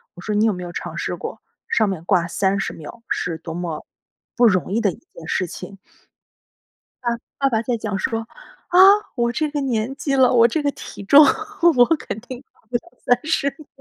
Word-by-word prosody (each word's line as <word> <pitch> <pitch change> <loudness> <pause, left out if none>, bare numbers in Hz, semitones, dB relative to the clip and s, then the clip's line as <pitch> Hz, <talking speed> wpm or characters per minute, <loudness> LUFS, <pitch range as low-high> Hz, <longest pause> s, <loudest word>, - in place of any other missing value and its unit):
我 175 - -11
说： 210 - -3
“你 210 +1 +3
有 220 - +2
没 180 -1 -6
有 175 - -7
尝 - - -6
试 - - -3
过， - - -7 0.3
上 220 -3 +2
面 175 -4 -5
挂 180 -3 +2
30 195 +2 0
秒 165 +9 -11
是 170 -2 -2
多 160 0 -8
么 170 -2 -5 0.5
不 240 0 +6
容 185 -3 +1
易 230 - +1
的 205 -4 +2
一 - - -11
件 160 - -14
事 185 - 0
情。 195 +3 -9 1.6
“爸 275 - +2
爸 225 - +1
爸 - - -1
在 240 0 -1
讲 210 -3 -3
说， 225 +2 -2 0.4
“啊， 360 - +3 0.4
我 235 -1 +1
这 305 +3 -1
个 295 0 -2
年 250 -2 -1
纪 280 -2 -2
了 260 -1 +5
我 235 -1 +6
这 300 +6 -1
个 285 - +1
体 200 - -10
重， 280 +9 +8 0.5
我 245 - +7
肯 220 - -6
定 250 +1 -9
挂 - - -32
不 245 - +1
了 235 - -4 0.4
30 280 -3 0
秒。 310 - -13
225 Hz, 215 characters per minute, -21 LUFS, 185-255 Hz, 1.6 s, 重